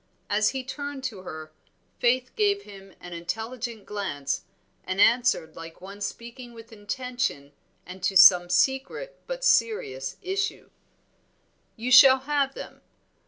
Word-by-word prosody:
As 210 Hz, +1 st, +3 dB
he 265 Hz, -1 st, -4 dB
turned 285 Hz, +1 st, -6 dB
to 225 Hz, -8 st, -5 dB
her, 155 Hz, -3 st, -9 dB, 0.5 s
Faith 255 Hz, +1 st, +1 dB
gave 405 Hz, -2 st, +1 dB
him 195 Hz, -2 st, -14 dB
an 175 Hz, -, -10 dB
intelligent 225 Hz, +6 st, -5 dB
glance, 145 Hz, -10 st, -4 dB, 0.4 s
and 185 Hz, +1 st, -4 dB
answered 235 Hz, -9 st, +3 dB
like 165 Hz, 0 st, -10 dB
one 195 Hz, +2 st, -11 dB
speaking 235 Hz, +3 st, -7 dB
with 230 Hz, 0 st, -13 dB
intention 215 Hz, -, -4 dB, 0.3 s
and 185 Hz, +1 st, -10 dB
to 190 Hz, +1 st, +2 dB
some 180 Hz, -2 st, +8 dB
secret 270 Hz, -, -1 dB
but -, -, -5 dB
serious 135 Hz, -, +1 dB
issue 385 Hz, +2 st, -3 dB, 1.0 s
"You 240 Hz, +3 st, -4 dB
shall 260 Hz, +1 st, +8 dB
have 275 Hz, -1 st, -1 dB
them. -, -, -10 dB
230 Hz, 130 wpm, -26 LUFS, 185-265 Hz, 1.0 s, some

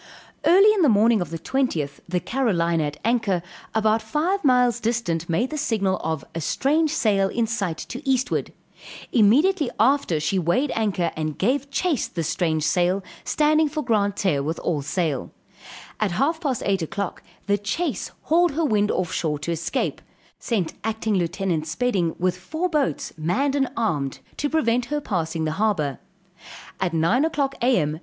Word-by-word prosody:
Early 395 Hz, +4 st, +7 dB
in 410 Hz, -, +1 dB
the 305 Hz, -, +5 dB
morning 220 Hz, 0 st, +4 dB
of 175 Hz, -, -3 dB
the 165 Hz, -, -4 dB
20th, 165 Hz, -, -1 dB
the 180 Hz, 0 st, +1 dB
Carolina 170 Hz, -, 0 dB
at 145 Hz, 0 st, -5 dB
anchor, 220 Hz, -7 st, +1 dB, 0.3 s
about 220 Hz, 0 st, +2 dB
five 320 Hz, -, -1 dB
miles 250 Hz, -3 st, +3 dB
distant, 215 Hz, -9 st, -1 dB
made 225 Hz, -, 0 dB
the 305 Hz, -, -3 dB
signal 195 Hz, -8 st, 0 dB
of 160 Hz, -3 st, -2 dB
a 165 Hz, -, -3 dB
"strange 305 Hz, -, +1 dB
sail 205 Hz, -10 st, +2 dB
in 235 Hz, +2 st, 0 dB
sight 200 Hz, -7 st, -2 dB
to 255 Hz, -, -7 dB
eastward"; 260 Hz, -1 st, 0 dB, 0.6 s
immediately 285 Hz, -, +4 dB
after 240 Hz, -, +3 dB
she 185 Hz, +5 st, 0 dB
weighed 180 Hz, -, +1 dB
anchor, 195 Hz, -7 st, 0 dB
and 155 Hz, -1 st, -3 dB
gave 275 Hz, +7 st, 0 dB
chase 305 Hz, -1 st, 0 dB
the 170 Hz, -, -4 dB
strange 160 Hz, 0 st, 0 dB
sail, 180 Hz, +4 st, +1 dB, 0.2 s
standing 305 Hz, 0 st, +2 dB
for 305 Hz, +1 st, -3 dB
Grand 205 Hz, -5 st, +1 dB
Terre, 170 Hz, -10 st, +1 dB
with 160 Hz, +4 st, -2 dB
all 155 Hz, -4 st, -1 dB
sail; 150 Hz, -1 st, -2 dB, 0.7 s
at 210 Hz, -5 st, 0 dB
half 320 Hz, -, 0 dB
past 275 Hz, -8 st, -1 dB
8 195 Hz, -2 st, +1 dB
o'clock, 185 Hz, +4 st, -4 dB, 0.2 s
the 205 Hz, 0 st, +1 dB
chase 205 Hz, -, -2 dB
hauled 345 Hz, 0 st, +3 dB
her 320 Hz, +2 st, 0 dB
wind 210 Hz, -5 st, +2 dB
off 185 Hz, 0 st, -1 dB
shore 150 Hz, -3 st, -1 dB
to 150 Hz, +4 st, -4 dB
escape; 170 Hz, 0 st, -2 dB, 0.4 s
sent 200 Hz, -9 st, -1 dB
acting 220 Hz, 0 st, -1 dB
Lieut. 175 Hz, -3 st, -1 dB
Spedding 175 Hz, -1 st, 0 dB
with 180 Hz, 0 st, 0 dB
four 315 Hz, -, -2 dB
boats 290 Hz, -2 st, -1 dB
manned 195 Hz, -, +1 dB
and 270 Hz, -2 st, +1 dB
armed 150 Hz, -, -1 dB, 0.2 s
to 290 Hz, -, -1 dB
prevent 250 Hz, -6 st, +1 dB
her 295 Hz, +4 st, -2 dB
passing 165 Hz, -, -2 dB
the 155 Hz, -, -1 dB
harbor; 155 Hz, -11 st, 0 dB, 0.8 s
at 185 Hz, -2 st, 0 dB
9 165 Hz, -, +2 dB
o'clock 285 Hz, -4 st, 0 dB
A.M. 160 Hz, -, +2 dB
210 Hz, 165 wpm, -23 LUFS, 170-270 Hz, 0.8 s, Early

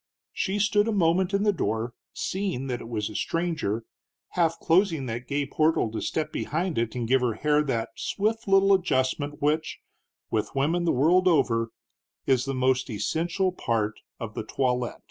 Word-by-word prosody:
She 195 Hz, +1 st, -1 dB
stood 205 Hz, +1 st, +3 dB
a -, -, +1 dB
moment 185 Hz, -1 st, +2 dB
in 200 Hz, 0 st, +1 dB
the 210 Hz, -1 st, +3 dB
door, 115 Hz, -, -2 dB, 0.2 s
seeing 190 Hz, -9 st, -2 dB
that 125 Hz, -2 st, -3 dB
it 115 Hz, -, -9 dB
was 105 Hz, -3 st, -2 dB
a 105 Hz, -, -8 dB
stranger, 135 Hz, -, -1 dB, 0.4 s
half 165 Hz, -2 st, +1 dB
closing 165 Hz, -4 st, +2 dB
that 120 Hz, +1 st, -5 dB
gay 145 Hz, +1 st, 0 dB
portal 155 Hz, -5 st, +1 dB
to 110 Hz, -, -4 dB
step 155 Hz, -1 st, -2 dB
behind 170 Hz, -1 st, -2 dB
it 115 Hz, 0 st, -2 dB
and 120 Hz, -2 st, -2 dB
give 130 Hz, +2 st, +3 dB
her 120 Hz, -3 st, 0 dB
hair 150 Hz, +4 st, +2 dB
that 115 Hz, -5 st, -1 dB
swift 220 Hz, +2 st, -1 dB
little 195 Hz, 0 st, +5 dB
adjustment 145 Hz, -5 st, 0 dB
which, 155 Hz, +2 st, 0 dB, 0.5 s
with -, -, -1 dB
women 165 Hz, +6 st, +1 dB
the 170 Hz, -, +3 dB
world 175 Hz, +8 st, +4 dB
over, 120 Hz, -9 st, +2 dB, 0.6 s
is 130 Hz, -2 st, +2 dB
the 135 Hz, -1 st, -2 dB
most 130 Hz, 0 st, +1 dB
essential 165 Hz, -, 0 dB
part 110 Hz, -10 st, -1 dB, 0.2 s
of 110 Hz, -2 st, -5 dB
the -, -, -4 dB
toilet. 125 Hz, +1 st, -1 dB
145 Hz, 175 wpm, -26 LUFS, 120-180 Hz, 0.6 s, little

